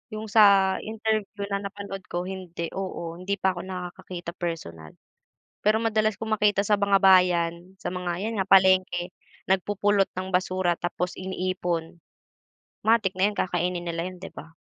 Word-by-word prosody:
yung 215 0 -6
sa 200 -3 +6
interview 215 -2 -2
na 200 - 0
napanood 200 -1 -8
ko 175 +1 -3
hindi, 180 -3 -6
oo, 170 -3 -5
hindi 195 +2 -2
pa 190 -1 +1
ko 180 - -7
nakakakita 180 -1 -6
personal. 160 - -6 0.7
Pero 215 +1 +3
madalas 215 -2 +1
kong 220 -1 -2
makita 205 -1 +2
sa 205 0 +2
mga 200 -1 +4
bayan, 180 -1 +3
sa 180 - -5
mga 180 +1 -3
'yan 225 - -2
nga 190 - -3
palengke, 185 -2 +4 0.3
nagpupulot 200 +1 +2
ng 185 0 -4
basura 185 -1 +1
tapos 175 +1 -3
iniipon. 180 -3 -3 0.8
Matik 220 -4 +3
na 195 +3 +2
'yun - - -14
kakainin 175 0 0
nila 170 -1 -3
'yun 185 0 -7
'di - - -7
ba? 160 - -10
185 Hz, 155 wpm, -26 LUFS, 175-200 Hz, 0.8 s, sa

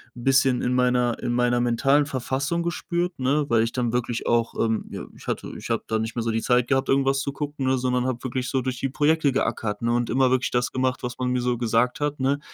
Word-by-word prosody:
'n 120 - -9
bisschen 135 -1 +3
in 125 - +1
meiner 125 -1 +2
in 120 - -1
meiner 120 0 +2
mentalen 135 +5 +2
Verfassung 140 +5 -2
gespürt, 175 0 -2
ne, 140 +3 +1
weil 115 -1 +4
ich 115 +1 -1
dann 120 -2 -1
wirklich 120 -1 -2
auch, 115 -1 +1
ähm, 110 -1 -1
ja - - -6
ich - - -15
hatte - - -3
ich - - -8
habe - - 0
da 110 0 0
nicht 110 +1 -4
mehr 115 - -1
so 115 - 0
die 115 - -1
Zeit 125 0 +2
gehabt, 135 -1 +1
irgendwas 135 0 +2
zu 140 +1 -2
gucken, 145 -2 -3
ne, 130 0 +2
sondern 125 0 0
habe 125 0 -3
wirklich 130 0 -3
so 130 - 0
durch 130 0 -3
die 135 - -1
Projekte 150 +1 +2
geackert, 115 -5 -1
ne, 115 - +1
und 120 -1 0
immer 130 +1 +3
wirklich 130 0 +1
das 125 0 0
gemacht, 130 0 -1
was 125 +1 -5
man 125 0 0
mir 125 0 0
so 125 -1 0
gesagt 120 +2 +1
hat, 145 -1 -2
ne? 135 +2 +1
125 Hz, 255 wpm, -24 LUFS, 120-135 Hz, -, weil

